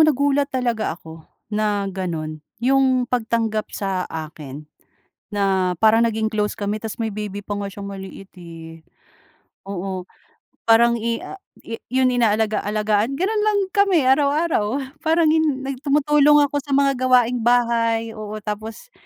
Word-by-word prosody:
nagulat 285 0 +2
talaga 240 - -1
ako 160 -1 -13 0.2
na 210 -1 0
gano'n 160 -5 -4 0.2
'yong 260 +1 +2
pagtanggap 225 -3 -1
sa 190 -2 -3
akin 155 -3 -8 0.7
na 190 -2 +1
parang 220 +1 +5
naging 220 -1 0
close 210 -1 0
kami, 205 0 -2
tapos 220 -2 -6
may 225 - -1
baby 205 -1 -5
pa 205 - -3
nga 205 - -3
siyang 200 0 -8
maliit, 195 0 -9
eh, 165 -1 -11 0.9
oo. 190 -1 -4 0.6
Parang 235 +1 +6
i 230 +1 -1
ah, 390 - -8 0.2
i 230 0 -6
'yon 255 +1 +2
inaalagaalagaan 215 0 +1
gano'n 420 +8 0
lang 420 -1 +3
kami 395 -5 +3
araw-araw. 280 -2 +2 0.2
Parang 325 0 +2
hin 310 -4 +1
nag 270 -1 -4
tumutulong 295 0 +4
ako 290 0 0
sa 285 -1 -3
mga 275 -2 +2
gawaing 250 -1 +4
bahay 230 -1 +2
oo, 215 -1 -7
tapos, 215 - -6
225 Hz, 140 wpm, -21 LUFS, 205-270 Hz, 0.9 s, Parang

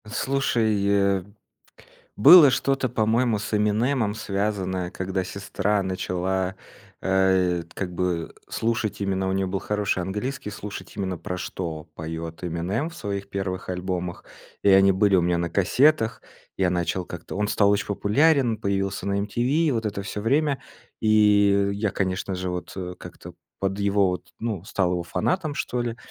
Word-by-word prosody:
Слушай, 115 -4 0
э, 100 -2 +2 0.9
было 150 - +9
что-то, 135 0 0
по-моему, 115 0 +1
с 100 +1 -4
Эминемом 105 +2 +1
связанное, 100 -4 -2
когда 95 +1 -2
сестра 100 +2 -1
начала, 95 0 -2 0.4
э, 95 -2 +2
как 90 -2 -4
бы 85 -2 -2
слушать 110 -2 -1
именно, 95 -1 -1
у - - 0
неё 95 0 0
был 95 +1 -2
хороший 105 -3 -1
английский, 105 +6 -4
слушать 105 -3 -8
именно 95 -3 -2
про 90 +2 -5
что 85 -3 -5
поёт 80 0 -6
Эминем 90 - -2
в 170 - -13
своих 100 -2 -4
первых 95 -2 -4
альбомах, 90 -1 -3 0.4
и 100 - +6
они 95 0 +6
были 100 +1 +3
у 95 - +5
меня 85 0 +1
на 85 0 -2
кассетах, 115 - +3 0.4
я 95 -1 +2
начал 90 +1 -1
как-то. 90 +1 -8
Он 105 +1 0
стал 100 -2 +3
очень 100 +1 +1
популярен, 120 +5 +2
появился 100 -2 -2
на 100 0 0
MTV 125 +10 +1
и - - +3
вот 115 -4 -1
это 100 -1 -3
всё 100 +1 -5
время. 140 +5 +1 0.4
И 105 -2 +4
я, 100 +1 -1
конечно 95 0 -2
же, 90 0 -3
вот 90 +1 -6 0.2
как-то - - -11 0.3
под 95 0 -1
его 100 -1 +2
вот 90 0 -4
ну, 110 -6 -3
стал 95 -3 0
его 90 -1 -1
фанатом, 155 - -1
что 125 -3 -2
ли. 120 -1 -3
100 Hz, 155 wpm, -24 LUFS, 95-110 Hz, 0.9 s, было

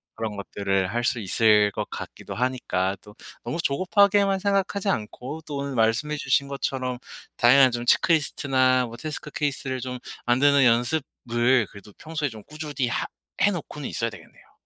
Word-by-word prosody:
그런 110 -2 -4
것들을 95 0 -1
할 120 - -1
수 120 0 0
있을 105 0 +3
것 - - -4
같기도 - - -8
하니까 105 -7 -1
또 105 0 -15 0.3
너무 165 - -3
조급하게만 195 +6 +3
생각하지 200 0 0
않고 130 - -4
또 145 -2 -4
오늘 140 -1 -3
말씀해 115 +7 +1
주신 140 0 +1
것처럼 130 -2 -3 0.4
다양한 130 +1 +6
좀 120 0 -3
체크리스트나 130 -4 +3
뭐 115 0 -9
태스크 150 +1 -6
케이스를 135 -3 -2
좀 125 0 -5 0.3
만드는 140 +3 +4
연습을 120 -1 +1
그래도 100 0 -13
평소에 155 -3 -3
좀 110 -3 -11
꾸준히 150 -4 -3
하 120 - -1 0.4
해 205 - +5
놓고는 150 -5 -6
있어야 115 -1 -2
되겠네요. - - -16
130 Hz, 360 characters per minute, -25 LUFS, 115-150 Hz, 0.4 s, 다양한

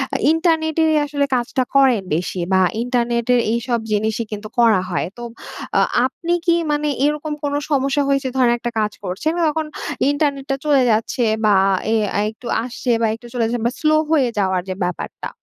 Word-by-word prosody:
আ - - +3
ইন্টারনেটেরই 320 -1 +2
আসলে 285 -1 0
কাজটা 245 +1 0
করেন 265 -6 +5
বেশি 180 +2 -3
বা, 190 - +4 0.2
ইন্টারনেটের 240 0 +1
এইসব 235 0 -1
জিনিসই 220 +2 0
কিন্তু 210 0 -5
করা 225 -6 +5
হয়। 175 - -1
তো 240 - -7 0.6
আ - - +4 0.2
আপনি 335 +6 -2
কি 340 -2 +4 0.2
মানে 295 0 0 0.2
এইরকম 300 +1 -1
কোন 285 - -1 0.2
সমস্যা 275 +1 +1
হয়েছে? 275 0 +1
ধরেন, 245 -2 +3
একটা 240 0 -3
কাজ 210 -1 -1
করছেন 195 - -2
তখন 310 +1 -1 0.4
ইন্টারনেটটা 280 -2 0
চলে 285 -3 +4
যাচ্ছে 225 +2 0 0.2
বা, 210 - +5 0.4
এ - - +3 0.3
একটু 230 +2 -11 0.2
আসছে 250 0 -3
বা, 225 - +3
একটু 240 +1 -13
চলে 240 -2 0
যাচ্ছে 230 0 -2
বা, - - -1
স্লো 310 0 +3 0.2
হয়ে 270 -6 +3
যাওয়ার 190 -2 +1
যে 185 - -2
ব্যাপারটা? 180 -1 -4
250 Hz, 170 wpm, -20 LUFS, 225-295 Hz, 0.6 s, করেন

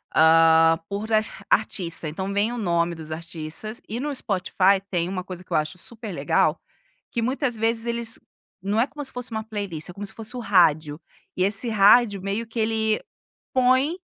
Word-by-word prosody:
hã, 165 0 +6
por 210 +3 -4
art 215 0 +3 0.2
artista, 175 -6 0
então, 190 +5 -4
vem 205 +3 +1
o 245 - -4
nome 170 -4 0
dos 160 -1 -9
artistas, 165 +6 -6
e 225 - -4
no 290 +2 -2
Spotify, 195 -3 +2
tem 175 -2 0
uma 185 0 -4
coisa 185 -1 -8
que - - -8
eu - - +4
acho 155 +4 -2
super 220 +2 -8
legal, 175 - +1 0.5
que 235 - -1
muitas 255 0 -1
vezes 225 +1 +1
eles 235 -1 -2 0.4
não 205 +3 0
é 250 - +2
como 290 +1 -7
se - - -6
fosse 250 0 -5
uma 220 -1 -3
playlist, 200 -8 -5
é - - -8
como 200 +3 -8
se 195 - -5
fosse 225 +2 -6
o - - -3
rádio, 160 -8 +3 0.4
e 185 - +2
esse 205 +4 0
rádio, 210 0 +5
meio 200 +4 -3
que 225 +1 -5
ele 220 0 +1 0.5
põe 260 +6 +3
205 Hz, 190 wpm, -24 LUFS, 175-230 Hz, 0.5 s, hã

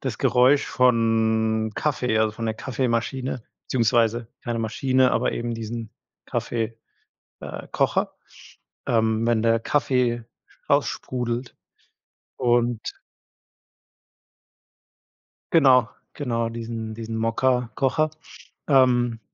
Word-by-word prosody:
das 130 -5 -4
Geräusch 130 +3 +4
von 110 -2 +2
Kaffee, 125 -7 0
also 110 -1 +2
von 115 +1 -6
der 110 - -1
Kaffeemaschine, 125 0 -2 0.2
beziehungsweise 115 -1 +1 0.2
keine 120 -1 -2
Maschine, 130 +3 +2
aber 115 - +1
eben 120 0 -3
diesen 115 0 -6 0.4
Kaffee 115 -1 -3 0.6
äh, - - -7
Kocher, - - 0 0.7
ähm, 110 -1 +2
wenn 115 -2 +2
der 115 0 +3
Kaffee 125 -2 +1 0.5
raussprudelt 120 0 -1 0.8
und 120 -2 +1 2.6
Genau, 130 -7 +5 0.3
genau, 115 -5 -1
diesen 115 -1 -5
diesen 115 0 -5
Mokka-Kocher. 125 +5 +1 0.6
Ähm. 120 -4 +3
115 Hz, 90 wpm, -24 LUFS, 115-125 Hz, 2.6 s, Genau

